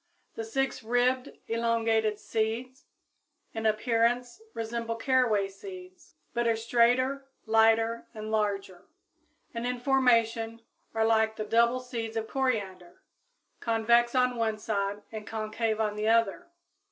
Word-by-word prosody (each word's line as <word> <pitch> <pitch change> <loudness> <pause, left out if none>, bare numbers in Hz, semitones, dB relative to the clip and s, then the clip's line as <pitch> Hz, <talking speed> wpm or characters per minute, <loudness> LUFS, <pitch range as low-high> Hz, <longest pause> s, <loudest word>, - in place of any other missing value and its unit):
The 225 - -5
six 265 +3 -2
ribbed, 245 +3 +1 0.2
elongated 225 -2 +1
"seeds" 230 +5 -3 0.7
in 225 0 -1
appearance 235 - +1
resemble 230 0 -3
caraway 230 -4 +2
seeds, 365 - -12 0.2
but 235 0 0
are 230 - +3
straighter, 245 +4 +2 0.2
lighter 225 +1 +3
and 215 0 -6
larger, 200 -4 -2 0.7
and 235 +1 -3
in 250 0 -2
formation 230 -3 +2 0.3
are 220 0 +2
like 220 -1 +2
the 215 - -4
double 235 +3 +3
seeds 230 -3 -5
of 220 0 -2
coriander, 205 -10 -3 0.6
convex 235 +2 +2
on 250 -1 +2
one 220 -2 0
side 205 -1 -2
and 215 -1 -7
concave 220 0 -2
on 210 -1 0
the 210 +1 -2
other. 230 - +2
230 Hz, 125 wpm, -28 LUFS, 220-245 Hz, 0.7 s, are